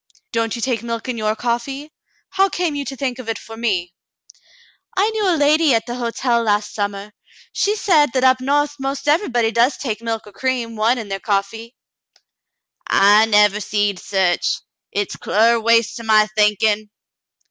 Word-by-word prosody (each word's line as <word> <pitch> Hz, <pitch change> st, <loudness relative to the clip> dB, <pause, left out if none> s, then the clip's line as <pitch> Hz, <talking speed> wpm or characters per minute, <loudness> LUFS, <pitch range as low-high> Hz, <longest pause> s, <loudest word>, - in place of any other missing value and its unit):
"Don't 230 Hz, 0 st, -1 dB
you 235 Hz, -, -5 dB
take 245 Hz, -5 st, -1 dB
milk 230 Hz, +1 st, -5 dB
in 250 Hz, -, -2 dB
your 215 Hz, -1 st, -1 dB
coffee.'^ 255 Hz, +6 st, -3 dB, 0.4 s
How 390 Hz, +1 st, +2 dB
came 350 Hz, -4 st, -2 dB
you 285 Hz, 0 st, -3 dB
to 270 Hz, -, -6 dB
think 260 Hz, -2 st, -3 dB
of 235 Hz, -3 st, -7 dB
it 225 Hz, -, -2 dB
for 225 Hz, -, -11 dB
me? 190 Hz, -7 st, -2 dB, 0.5 s
" -, -, -31 dB
"I 410 Hz, +4 st, +2 dB
knew 430 Hz, -3 st, 0 dB
a 340 Hz, -, +2 dB
lady 295 Hz, -1 st, +3 dB
at 225 Hz, 0 st, -1 dB
the 240 Hz, -, -5 dB
hotel 240 Hz, 0 st, -1 dB
last 210 Hz, -2 st, 0 dB
summer. 205 Hz, 0 st, -4 dB, 0.4 s
She 400 Hz, +3 st, +1 dB
said 310 Hz, -, +3 dB
that 260 Hz, -1 st, 0 dB
up 260 Hz, 0 st, +4 dB
no*th 290 Hz, +2 st, +1 dB
'most 275 Hz, +2 st, -4 dB
everybody 245 Hz, -, +1 dB
does 240 Hz, +4 st, +2 dB
take 225 Hz, -5 st, -4 dB
milk 225 Hz, -1 st, -4 dB
or 210 Hz, -, -13 dB
cream, 245 Hz, -2 st, -2 dB
one, 225 Hz, +4 st, +2 dB
in 225 Hz, -3 st, -6 dB
their 195 Hz, 0 st, -4 dB
coffee." 215 Hz, +5 st, -3 dB, 0.7 s
" -, -, -24 dB, 0.3 s
I 215 Hz, +1 st, +5 dB
never 210 Hz, -1 st, +4 dB
seed 205 Hz, -1 st, -1 dB
sech. 190 Hz, -3 st, 0 dB, 0.5 s
Hit's 205 Hz, -1 st, -3 dB
clar 230 Hz, +2 st, +2 dB
waste 230 Hz, 0 st, +2 dB
to 230 Hz, -, -8 dB
my 215 Hz, -1 st, +4 dB
thinkin'." 210 Hz, 0 st, +2 dB
230 Hz, 180 wpm, -19 LUFS, 215-270 Hz, 0.7 s, I